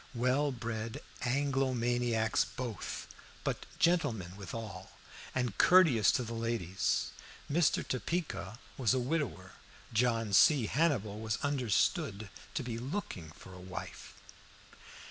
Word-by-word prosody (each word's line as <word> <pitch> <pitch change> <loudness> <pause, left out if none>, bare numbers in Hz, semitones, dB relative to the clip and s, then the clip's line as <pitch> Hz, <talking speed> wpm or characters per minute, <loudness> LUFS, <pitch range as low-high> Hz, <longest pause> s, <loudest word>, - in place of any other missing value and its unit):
Well 130 +4 +2
bred 115 -2 -4 0.3
Anglo 135 0 +1
maniacs 120 -2 +1
both, 125 -5 -5 0.4
but - - -2
gentlemen 120 - +1
withal, 100 -1 -7 0.4
and 125 -5 0
courteous 155 - +6
to 125 - +1
the 115 0 -5
ladies. 115 -5 -1 0.4
Mr. 155 0 +2
Topeka 130 - -2 0.2
was 130 0 +3
a - - +2
widower, 125 - -2 0.4
John 115 -2 +1
C. 135 +4 +6
Hannibal 110 -8 +1
was 110 0 -1
understood 115 -6 +1 0.3
to 145 - -1
be 115 -2 -4
looking 125 - -4
for 95 - -13
a 90 - -10
wife. 95 +1 -8
120 Hz, 115 wpm, -33 LUFS, 110-135 Hz, 0.4 s, courteous